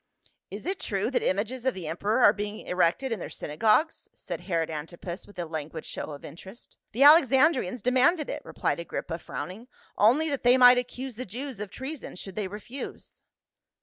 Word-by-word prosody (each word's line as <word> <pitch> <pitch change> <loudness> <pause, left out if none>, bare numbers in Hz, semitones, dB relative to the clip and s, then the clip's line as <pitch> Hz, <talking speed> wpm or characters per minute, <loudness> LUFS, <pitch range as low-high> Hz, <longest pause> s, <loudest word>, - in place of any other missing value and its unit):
"Is - - -8
it 380 +1 -2
true 200 +4 -2
that - - +1
images 225 +6 -1
of 260 -1 0
the 180 -4 -6
emperor 205 +9 0
are 205 - +8
being 210 +1 -5
erected 180 +9 +1
in 225 - -2
their - - -6
synagogues?" 215 - +1
said - - -6
Herod 165 -3 -1
Antipas 170 +4 -7
with 205 - -17
a 175 - -3
languid 160 0 -6
show - - -5
of 145 -2 -9
interest. 190 +9 -12 0.2
"The 250 +6 +2
Alexandrians 270 - +5
demanded 270 +6 +3
it," - - -5
rephed - - -2
Agrippa, 170 0 -5
frowning, 210 +8 -7 0.3
"only 255 +10 +5
that 280 - -2
they 245 +1 +5
might 250 -1 +8
accuse 250 -1 -6
the 255 - -5
Jews 250 +3 -6
of 210 -1 -5
treason 265 +7 -7
should 190 +1 -9
they 210 -2 -2
refuse." 215 +7 -9
215 Hz, 180 wpm, -27 LUFS, 180-260 Hz, 0.3 s, are